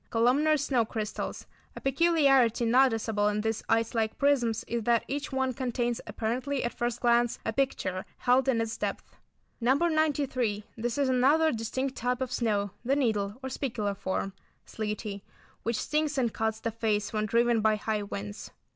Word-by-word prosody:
Columnar 265 Hz, +7 st, +3 dB
snow 270 Hz, -5 st, +1 dB
crystals; 215 Hz, -1 st, -4 dB, 0.3 s
a -, -, -6 dB
peculiarity 270 Hz, -5 st, +3 dB
noticeable 225 Hz, -4 st, +3 dB
in 210 Hz, 0 st, 0 dB
these 220 Hz, 0 st, -1 dB
ice 225 Hz, 0 st, +2 dB
like 220 Hz, -2 st, -1 dB
prisms 255 Hz, -6 st, +2 dB
is 235 Hz, 0 st, -3 dB
that 235 Hz, -1 st, +2 dB
each 285 Hz, +2 st, -3 dB
one 265 Hz, -1 st, 0 dB
contains 240 Hz, -2 st, -2 dB
apparently, 245 Hz, +6 st, -2 dB
at 240 Hz, -, -2 dB
first 240 Hz, 0 st, -2 dB
glance, 240 Hz, -1 st, +3 dB
a 225 Hz, -, -1 dB
picture 190 Hz, -8 st, -1 dB
held 255 Hz, +1 st, +3 dB
in 250 Hz, -4 st, +2 dB
its 225 Hz, 0 st, -2 dB
depths. -, -, -2 dB, 0.6 s
No. 250 Hz, +3 st, +3 dB
93. 285 Hz, -9 st, +1 dB
This 235 Hz, +2 st, -3 dB
is 280 Hz, -1 st, +2 dB
another 280 Hz, +5 st, +4 dB
distinct 260 Hz, +4 st, -3 dB
type 250 Hz, +1 st, -1 dB
of 260 Hz, -1 st, -3 dB
snow, 205 Hz, -5 st, 0 dB
the 265 Hz, +3 st, +2 dB
needle, 215 Hz, -7 st, 0 dB
or 265 Hz, -, -3 dB
spicular 220 Hz, -7 st, -2 dB
form—sleety, 200 Hz, +2 st, -5 dB, 0.4 s
which 230 Hz, -1 st, -1 dB
stings 300 Hz, -1 st, 0 dB
and 240 Hz, -4 st, +1 dB
cuts 220 Hz, 0 st, -1 dB
the 230 Hz, -, -2 dB
face 215 Hz, -2 st, -1 dB
when 215 Hz, 0 st, 0 dB
driven 235 Hz, 0 st, +3 dB
by 215 Hz, 0 st, +3 dB
high 215 Hz, 0 st, -2 dB
winds. 105 Hz, -, -6 dB
235 Hz, 165 wpm, -29 LUFS, 220-265 Hz, 0.6 s, another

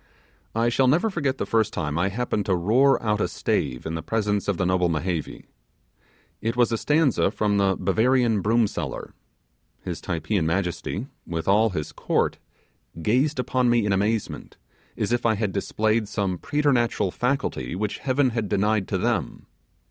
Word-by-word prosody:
I 115 Hz, +1 st, +2 dB
shall 130 Hz, +2 st, +2 dB
never 170 Hz, -, +3 dB
forget 140 Hz, -7 st, -1 dB
the -, -, -2 dB
first 110 Hz, -2 st, +1 dB
time 75 Hz, 0 st, -2 dB
I 90 Hz, +4 st, +1 dB
happened 105 Hz, -1 st, -2 dB
to 95 Hz, -, +3 dB
roar 120 Hz, +11 st, +3 dB
out 105 Hz, -1 st, +1 dB
a -, -, +1 dB
stave 65 Hz, -3 st, -2 dB
in 80 Hz, -, -3 dB
the 80 Hz, -, -3 dB
presence 105 Hz, +2 st, -1 dB
of 100 Hz, -4 st, 0 dB
noble 90 Hz, 0 st, +1 dB
Mehevi. 85 Hz, 0 st, -3 dB, 1.0 s
It 115 Hz, +2 st, -1 dB
was 120 Hz, -1 st, +3 dB
a 115 Hz, -, +1 dB
stanza 150 Hz, -3 st, +2 dB
from 105 Hz, -1 st, 0 dB
the 95 Hz, -1 st, +2 dB
'Bavarian 115 Hz, +3 st, +2 dB
broom 115 Hz, +3 st, +3 dB
seller'. -, -, -5 dB, 0.7 s
His -, -, -5 dB
Typeean 85 Hz, +1 st, -1 dB
majesty, 90 Hz, +4 st, -2 dB, 0.2 s
with 80 Hz, -1 st, -4 dB
all 105 Hz, +3 st, +4 dB
his 75 Hz, -6 st, -4 dB
court, -, -, -1 dB, 0.6 s
gazed 130 Hz, -, +2 dB
upon 125 Hz, -1 st, +1 dB
me 120 Hz, -3 st, +3 dB
in 100 Hz, -, +1 dB
amazement, 105 Hz, +2 st, -2 dB, 0.4 s
as -, -, -1 dB
if 120 Hz, 0 st, +1 dB
I 115 Hz, -1 st, +3 dB
had 105 Hz, -1 st, -1 dB
displayed 110 Hz, +2 st, 0 dB
some 95 Hz, -4 st, -2 dB
preternatural 125 Hz, -9 st, +1 dB
faculty 125 Hz, -, -2 dB
which 105 Hz, +2 st, -3 dB
Heaven 130 Hz, -1 st, +1 dB
had 115 Hz, -3 st, -2 dB
denied 105 Hz, 0 st, +1 dB
to -, -, -1 dB
them. -, -, -2 dB
105 Hz, 165 wpm, -24 LUFS, 95-120 Hz, 1.0 s, all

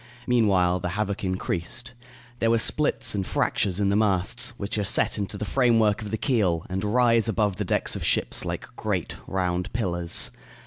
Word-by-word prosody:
Meanwhile, 95 Hz, -7 st, +2 dB
the 90 Hz, -, -3 dB
havoc 100 Hz, -2 st, -2 dB
increased. 95 Hz, +5 st, -3 dB, 0.5 s
There 115 Hz, -, +2 dB
were 115 Hz, -, +4 dB
splits 150 Hz, +6 st, +1 dB
and 100 Hz, -2 st, -1 dB
fractures 95 Hz, 0 st, 0 dB
in 100 Hz, -1 st, +2 dB
the 100 Hz, -, +2 dB
masts, 105 Hz, +3 st, +1 dB
which 105 Hz, +2 st, -3 dB
are -, -, 0 dB
set 100 Hz, -, +2 dB
into 100 Hz, -, -3 dB
the 105 Hz, -, -4 dB
framework 115 Hz, -4 st, +2 dB
of 105 Hz, -, -6 dB
the 110 Hz, -, -2 dB
keel 100 Hz, -, 0 dB
and 95 Hz, +1 st, -2 dB
rise 115 Hz, +1 st, +3 dB
above 105 Hz, -4 st, 0 dB
the -, -, -2 dB
decks -, -, 0 dB
of -, -, -4 dB
ships -, -, +2 dB
like -, -, -4 dB
great, -, -, -3 dB
round 90 Hz, 0 st, -2 dB
pillars. 85 Hz, -7 st, 0 dB
105 Hz, 180 wpm, -25 LUFS, 95-115 Hz, 0.5 s, were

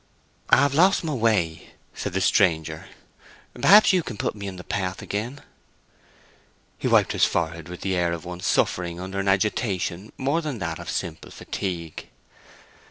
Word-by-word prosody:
"I -, -, +7 dB
have 140 Hz, +1 st, +3 dB
lost 185 Hz, +6 st, +4 dB
my 155 Hz, -2 st, -2 dB
way," 105 Hz, -10 st, 0 dB, 0.2 s
said -, -, -5 dB
the 95 Hz, -, 0 dB
stranger. 80 Hz, -6 st, +1 dB, 0.7 s
"Perhaps 210 Hz, 0 st, +6 dB
you 185 Hz, -, +3 dB
can 120 Hz, -9 st, -7 dB
put -, -, -1 dB
me 100 Hz, -1 st, -7 dB
in 95 Hz, -, -6 dB
the 90 Hz, -, -9 dB
path 95 Hz, -1 st, -3 dB
again." 120 Hz, +8 st, -4 dB, 1.4 s
He -, -, -1 dB
wiped -, -, +4 dB
his -, -, +3 dB
forehead 85 Hz, -1 st, -2 dB
with 90 Hz, -, -8 dB
the 95 Hz, -1 st, -1 dB
air 85 Hz, -1 st, +1 dB
of 85 Hz, 0 st, -5 dB
one 90 Hz, 0 st, -6 dB
suffering 85 Hz, -1 st, 0 dB
under 95 Hz, +2 st, -5 dB
an 100 Hz, -, -2 dB
agitation 95 Hz, -1 st, 0 dB
more 140 Hz, +5 st, 0 dB
than 150 Hz, -6 st, -4 dB
that 85 Hz, -4 st, -4 dB
of -, -, -7 dB
simple 80 Hz, -2 st, -4 dB
fatigue. 85 Hz, -5 st, -5 dB
95 Hz, 165 wpm, -24 LUFS, 85-115 Hz, 1.4 s, I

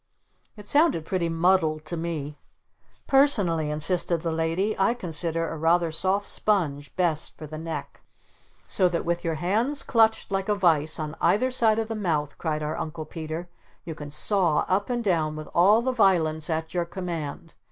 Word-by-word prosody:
It 205 Hz, -1 st, -11 dB
sounded 285 Hz, -, +3 dB
pretty 170 Hz, -1 st, -1 dB
muddled 165 Hz, -2 st, +2 dB
to 170 Hz, -, -4 dB
me. 160 Hz, -3 st, -4 dB, 0.7 s
"Personally," 200 Hz, -, +2 dB
insisted 165 Hz, +2 st, 0 dB
the 165 Hz, -, -1 dB
Lady, 165 Hz, +6 st, 0 dB
"I 210 Hz, +5 st, +3 dB
consider 165 Hz, -4 st, -3 dB
a -, -, -5 dB
rather 165 Hz, +1 st, +2 dB
soft 190 Hz, +5 st, 0 dB
sponge 150 Hz, -9 st, -1 dB
best 165 Hz, -4 st, -1 dB
for 155 Hz, -, -8 dB
the 155 Hz, +1 st, -7 dB
neck." 160 Hz, -3 st, -6 dB, 0.7 s
"So 185 Hz, -2 st, +2 dB
that 170 Hz, -1 st, -2 dB
with 170 Hz, 0 st, -1 dB
your 165 Hz, -2 st, -1 dB
hands 220 Hz, -, 0 dB
clutched 225 Hz, -3 st, +2 dB
like 195 Hz, +1 st, -1 dB
a 210 Hz, -, +3 dB
vise 160 Hz, -5 st, +2 dB
on 155 Hz, 0 st, -4 dB
either 255 Hz, +6 st, +3 dB
side 225 Hz, -4 st, +3 dB
of 225 Hz, -1 st, -1 dB
the 225 Hz, -, -3 dB
mouth," 160 Hz, -9 st, -2 dB
cried 155 Hz, -2 st, -2 dB
our 150 Hz, +1 st, -3 dB
Uncle 160 Hz, -1 st, -5 dB
Peter, 160 Hz, +1 st, -6 dB, 0.4 s
"you 165 Hz, -, -5 dB
can 145 Hz, -1 st, -8 dB
saw 170 Hz, +1 st, +1 dB
up 200 Hz, +4 st, 0 dB
and 240 Hz, -1 st, -1 dB
down 160 Hz, -6 st, +1 dB
with 155 Hz, 0 st, -7 dB
all 205 Hz, +7 st, +5 dB
the 260 Hz, -, +1 dB
violence 165 Hz, -9 st, +2 dB
at 160 Hz, 0 st, -2 dB
your 175 Hz, -1 st, 0 dB
command! 170 Hz, -3 st, -6 dB
170 Hz, 175 wpm, -26 LUFS, 155-195 Hz, 0.7 s, all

